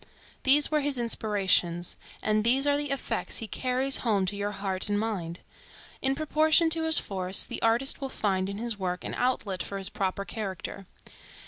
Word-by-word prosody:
These 285 +3 +4
were 305 - +3
his 285 -2 0
inspirations, 195 -7 +1 0.3
and 215 0 +2
these 260 +4 +3
are 285 0 +3
the 290 0 -2
effects 275 -1 -1
he 225 - -4
carries 255 +5 +1
home 205 -5 +1
to 185 - -2
your 205 0 -2
heart 195 -1 -2
and 205 0 +1
mind. 180 -6 -3 0.6
In 270 0 +1
proportion 315 +2 +3
to 325 0 +1
his 320 -2 +4
force, 190 -1 +2
the - - -5
artist 235 +5 +2
will 270 - -3
find 190 -5 -1
in 200 - -5
his 230 -2 -3
work 180 -1 -3
an - - -5
outlet 210 -7 -1
for 200 - -4
his 195 -1 -2
proper 195 0 -2
character. 195 -3 -6
215 Hz, 185 wpm, -28 LUFS, 195-270 Hz, 0.6 s, These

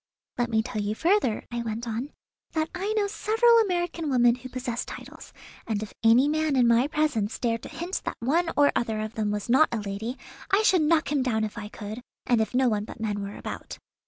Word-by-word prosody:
"Let 240 -1 +1
me 220 -1 +2
tell 235 -3 -3
you 205 +1 -2
further," 335 - +1
I 240 0 -2
went 230 +1 -4
on, 230 +5 -3 0.4
"that 315 0 -1
I 385 +3 -2
know 425 -2 +1
several 450 +3 +3
American 350 -6 0
women 240 -3 +4
who 255 +1 -8
possess 245 -2 -3
titles; - - -10 0.4
and 215 -2 -1
if 215 - -9
any 235 +5 +6
man 310 -1 +1
in 250 -2 +4
my 235 +3 +4
presence 295 -9 0
dared 230 -2 -1
to - - -9
hint 355 +3 -4
that - - -3
one 330 +8 +1
or 290 0 +5
other 220 -2 0
of 215 +1 -4
them 215 -2 -1
was 210 -1 -3
not 265 +6 +5
a 235 - -1
lady 210 +5 -4 0.3
I 405 +2 +3
should 370 -5 +4
knock 310 -1 +2
him 290 -2 +2
down 225 -4 0
if 215 - -3
I 220 -3 -6
could, 215 +2 -7 0.2
and 240 -2 +3
if 220 +2 -2
no 260 0 +4
one 210 -3 +1
but - - -10
men 210 -2 -2
were 200 0 -6
about. - - -7
245 Hz, 225 wpm, -26 LUFS, 220-315 Hz, 0.4 s, any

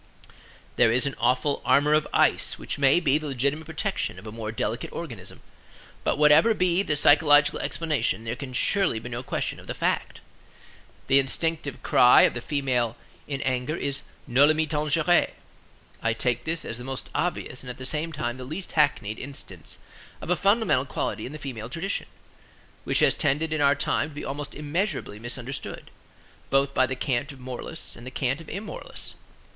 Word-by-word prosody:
There 115 - +5
is 125 +3 +3
an 140 - -1
awful 125 +4 +1
armor 145 +2 +4
of 155 0 +3
ice - - +3
which - - -5
may 140 +4 +5
be 150 -3 +2
the 155 - -6
legitimate 140 +4 -1
protection 165 - -2
of 95 - -11
a 110 - -6
more 110 -1 -5
delicate 110 - -3
organism; - - -7 0.6
but - - +1
whatever 150 +9 +6
be 180 -1 +2
the 155 -7 0
psychological 145 0 +5
explanation 150 - -1
there 115 +1 -3
can 135 0 -7
surely 195 - +2
be 115 +2 -6
no 120 0 -4
question - - -3
of - - -14
the - - -4
fact. - - -1 0.9
The 135 - +5
instinctive 145 +1 -1
cry 125 - +7
of - - +4
the 120 - -5
female 125 -5 0 0.3
in 140 -2 -3
anger 130 +3 -1
is 140 -4 -2 0.2
noli 140 +4 +5
me 160 0 +1
tangere. 155 +3 +2 0.7
I 115 0 +1
take 120 +1 -1
this 165 0 -2
as 115 - -5
the - - -7
most 130 0 -5
obvious 155 -7 -2
and 125 - -9
at 125 - -6
the 130 - -7
same 155 +4 -2
time 125 -5 -3
the 130 - -7
least 160 +8 -6
hackneyed 120 -8 +1
instance 140 +1 -9 0.4
of - - -5
a - - +5
fundamental 200 - +2
quality - - -3
in - - -8
the 155 - -7
female 120 -6 -6
tradition, 180 +9 -3 0.8
which - - +2
has - - +5
tended 155 +2 0
in 155 - 0
our 140 0 +5
time 145 +2 0
to 150 - -14
be - - -6
almost 145 +1 -5
immeasurably 150 - -2
misunderstood, 120 +3 -5 0.6
both 135 0 +2
by 130 - +3
the 130 - -3
cant 130 +2 -1
of 135 - -13
moralists 125 -1 -6
and 120 +2 -11
the - - -3
cant 130 +2 -1
of 160 - -13
immoralists. 205 +2 -6
140 Hz, 185 wpm, -26 LUFS, 125-155 Hz, 0.9 s, cry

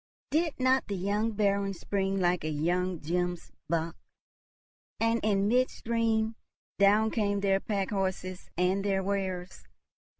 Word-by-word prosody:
did 320 -1 +1
not 260 +1 +3
the 200 - -2
young 205 +4 0
Baron 200 -2 +1
spring 195 +2 -1
like 180 -2 +1
a 155 - -1
young 175 +4 0
gemsbock? 170 -1 -2 1.1
And 230 +1 +2
in 200 -2 +2
midstream 230 -2 +1 0.4
down 210 +2 +5
came 205 -3 0
their 195 -1 +3
pack 195 -2 -2
horses 185 -2 -3
and 185 +2 +2
their 195 -1 +1
wares! 190 -2 -3
195 Hz, 125 wpm, -29 LUFS, 180-215 Hz, 1.1 s, down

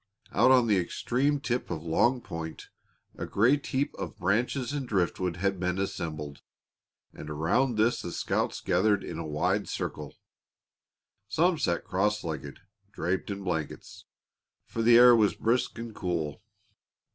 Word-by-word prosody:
Out - - +4
on 130 -2 +6
the 105 -4 +3
extreme 130 +10 0
tip 125 -2 -2
of 80 - -4
Long 105 +10 +2
Point 80 -4 -7 0.5
a - - -5
great 130 +8 +2
heap 135 +1 -1
of - - -5
branches 120 +7 0
and 140 -3 -3
driftwood 90 -3 0
had 95 +1 -1
been 90 0 -1
assembled, 75 -6 -4 0.7
and 75 - -9
around 85 - +1
this 110 +3 +2
the 85 - -5
scouts - - -1
gathered 105 -2 +2
in 80 - -6
a 80 - -4
wide 75 0 0
circle. - - -5 1.1
Some 165 - +2
sat 85 - 0
cross 105 +3 0
legged, 75 -4 -6 0.3
draped 90 0 -2
in 100 -1 -4
blankets, 80 -5 -4 0.6
for 115 - -4
the 115 +1 +7
air 125 0 +9
was 110 -3 +3
brisk 120 +3 0
and 115 -1 -6
cool. 85 -7 -3
100 Hz, 145 wpm, -28 LUFS, 85-120 Hz, 1.1 s, air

